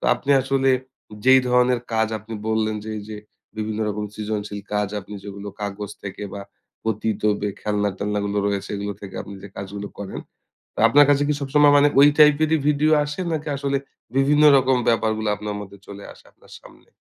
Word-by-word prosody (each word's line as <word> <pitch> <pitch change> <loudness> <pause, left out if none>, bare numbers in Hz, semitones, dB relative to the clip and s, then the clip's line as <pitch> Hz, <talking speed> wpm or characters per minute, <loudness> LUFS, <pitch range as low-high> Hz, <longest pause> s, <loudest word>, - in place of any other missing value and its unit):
তো - - -9
আপনি 140 - -4
আসলে 135 0 +1 0.5
যেই 130 0 +7
ধরনের 125 0 +3
কাজ 110 0 +2
আপনি 110 +2 -9
বললেন 110 -1 0
যে 110 - -6
এইযে 105 +1 -8 0.4
বিভিন্ন 110 0 -3
রকম 105 0 -3
সৃজনশীল 105 -1 -4
কাজ 105 -1 0
আপনি 100 +2 -11
যেগুলো 100 0 -7
কাগজ 100 0 -5
থেকে 100 +1 -7
বা 100 - -6 0.4
পতিত 110 0 -2 0.2
বে 105 - -1
খেলনা-টেলনা 105 0 -1
গুলো 100 0 -1
রয়েছে 100 -1 -2
এগুলো 100 +1 -4
থেকে 100 -1 -9
আপনি 100 - -10
যে - - -8
কাজগুলো 100 +1 -6
করেন। 100 -2 -6 0.5
তো - - -14
আপনার 145 +4 +6
কাছে 145 0 +3
কি 150 - +2
সবসময় 145 +1 +4
মানে 145 - +5
ওই 145 - +8
টাইপেরই 155 +1 +5
ভিডিও 150 +1 +2
আসে? 150 +4 -5
নাকি 155 -1 -3
আসলে 140 0 -1 0.4
বিভিন্ন 145 +2 +3 0.2
রকম 130 0 +2
ব্যাপারগুলা 110 -2 +1
আপনার 105 +1 -5
মধ্যে 100 0 -10
চলে 100 0 -10
আসে - - -20
আপনার - - -21
সামনে? - - -19
110 Hz, 180 wpm, -22 LUFS, 100-135 Hz, 0.5 s, ওই